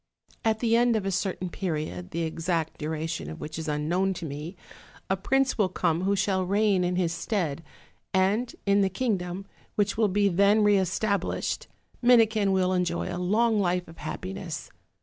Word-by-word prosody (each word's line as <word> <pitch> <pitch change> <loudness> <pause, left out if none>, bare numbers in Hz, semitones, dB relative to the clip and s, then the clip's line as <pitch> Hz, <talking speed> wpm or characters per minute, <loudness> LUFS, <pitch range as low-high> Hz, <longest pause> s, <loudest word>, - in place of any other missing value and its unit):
At 220 -1 +1
the 230 -1 +3
end 240 0 +4
of 210 -3 -1
a 195 - 0
certain 185 -1 -2
period, 155 - -3
the 170 +1 -2
exact 165 0 -2
duration 155 - -3
of 80 - -8
which 155 +1 -6
is 160 - -5
unknown 170 +6 0
to 170 - -6
me, 150 +5 -6 0.6
a - - +4
prince 265 +6 +1
will 195 -3 +3
come 170 -2 0
who 200 +1 +2
shall 195 -1 +1
reign 200 0 +2
in 180 0 0
his 175 -2 +1
stead; 170 -4 -2 0.5
and 200 +6 +1
in 200 0 +4
the 195 - +3
kingdom, 190 -4 -2 0.3
which 205 +1 +1
will 220 -1 +4
be 200 +1 +2
then 200 +3 +4
re 205 -1 +5
established, 200 +2 -1 0.3
Minikin 220 -4 +4
will 185 -1 +2
enjoy 180 0 -1
a 180 - -3
long 215 +4 +2
life 180 -1 0
of 165 - -13
happiness. 165 0 -6
185 Hz, 175 wpm, -27 LUFS, 170-205 Hz, 0.6 s, re